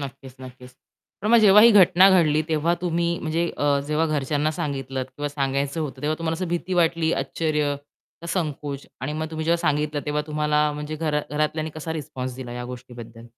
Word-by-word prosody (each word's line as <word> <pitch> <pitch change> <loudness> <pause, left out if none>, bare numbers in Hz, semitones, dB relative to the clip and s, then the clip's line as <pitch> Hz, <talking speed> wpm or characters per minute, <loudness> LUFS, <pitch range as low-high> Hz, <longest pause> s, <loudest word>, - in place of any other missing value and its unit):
नक्कीच, 135 -2 -8
नक्कीच. 125 0 -12 0.5
पण 210 - -1
मग 235 - +7
जेव्हा 210 -1 +7
ही 235 - +8
घटना 190 -2 +7
घडली 155 -4 +4
तेव्हा 160 +2 +1
तुम्ही 170 -1 0
म्हणजे 165 +2 -1
अ, 145 -1 +2
जेव्हा 155 +2 +1
घरच्यांना 150 0 0
सांगितलंत 135 -5 -3
किंवा 145 0 -2
सांगायचं 140 +1 -2
होतं 140 -3 -5
तेव्हा 150 +1 0
तुम्हाला 165 -1 -1
असं 180 +1 -4
भीती 175 +2 -2
वाटली, 165 -1 +2
आश्चर्य 150 -3 -1 0.5
का 170 - -8
संकोच 145 -5 -3
आणि 130 +4 -3
मग 155 +1 -3
तुम्ही 160 0 -4
जेव्हा 170 +1 +3
सांगितलं 150 -2 0
तेव्हा 150 0 0
तुम्हाला 150 0 +1
म्हणजे 150 +1 -5
घरा 150 -1 0
घरातल्यांनी 155 +1 -1
कसा 160 +1 -5
रिस्पॉन्स 130 -4 -5
दिला 125 -2 -7
या 125 0 -5
गोष्टीबद्दल? 120 -2 -10
150 Hz, 185 wpm, -24 LUFS, 140-165 Hz, 0.5 s, ही